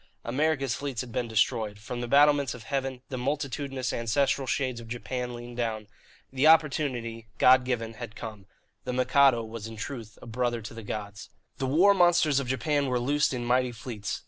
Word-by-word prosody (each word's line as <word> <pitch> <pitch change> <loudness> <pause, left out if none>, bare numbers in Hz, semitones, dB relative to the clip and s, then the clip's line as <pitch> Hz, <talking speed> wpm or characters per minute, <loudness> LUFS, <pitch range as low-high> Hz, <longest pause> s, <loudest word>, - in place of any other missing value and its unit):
America's 135 +1 0
fleets 140 -4 -3
had 125 -2 -8
been 120 0 -2
destroyed. 110 -2 0
From 120 +3 -6
the 120 - -3
battlements 145 -1 +4
of 120 - -11
heaven 130 +1 -3
the 130 - -4
multitudinous 135 -1 -2
ancestral 130 +3 0
shades 130 -3 -1
of 115 - -10
Japan 125 +1 -4
leaned 120 0 -9
down. 110 -3 -2 0.5
The 135 +3 +3
opportunity, 130 -8 +2
God 130 0 +6
given, 115 -3 -2
had 115 -1 -8
come. 105 -4 -8 0.4
The 125 - -3
Mikado 130 -1 +4
was 110 -1 -7
in 115 - -9
truth 115 -1 -7
a - - -12
brother 120 +1 -1
to 110 - -8
the 115 - -8
gods. 105 0 -6 0.3
The 135 - -1
war 175 +9 +5
monsters 175 -6 +4
of 135 - -4
Japan 140 +3 0
were 125 -1 0
loosed 145 +4 +1
in 125 -2 -3
mighty 125 +1 +2
fleets. 115 -3 -5
125 Hz, 185 wpm, -28 LUFS, 115-140 Hz, 0.5 s, God